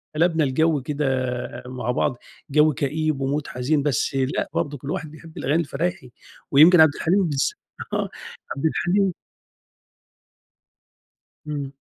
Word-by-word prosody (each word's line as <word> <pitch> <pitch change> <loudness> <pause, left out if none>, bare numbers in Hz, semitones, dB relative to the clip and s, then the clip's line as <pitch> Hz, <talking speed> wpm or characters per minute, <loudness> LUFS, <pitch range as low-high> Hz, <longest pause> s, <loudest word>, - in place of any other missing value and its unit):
قلبنا 165 -1 +2
الجو 145 +2 +2
كده 150 +2 -2 0.6
مع 125 -1 -3
بعض 125 0 0 0.3
جو 150 +1 +4
كئيب 150 +1 -1
ومود 145 +2 -1
حزين، 140 +4 0
بس 140 -1 0
لأ 135 0 -1
برضه 145 0 -2
كلّ 140 +3 -6
واحد 165 -5 -4
بيحب 160 +1 -13
الأغاني 150 +5 +1
الفرايحي، 165 -2 -3 0.4
ويمكن 160 +4 +8
عبد 155 -2 +5
الحليم 190 +4 +2
بالذ 145 -5 +1 0.5
آه، - - -1 0.5
عبد 140 +3 -4
الحليم 185 +4 +1 2.3
إمم. 145 -2 -4
150 Hz, 125 wpm, -23 LUFS, 135-160 Hz, 2.3 s, ويمكن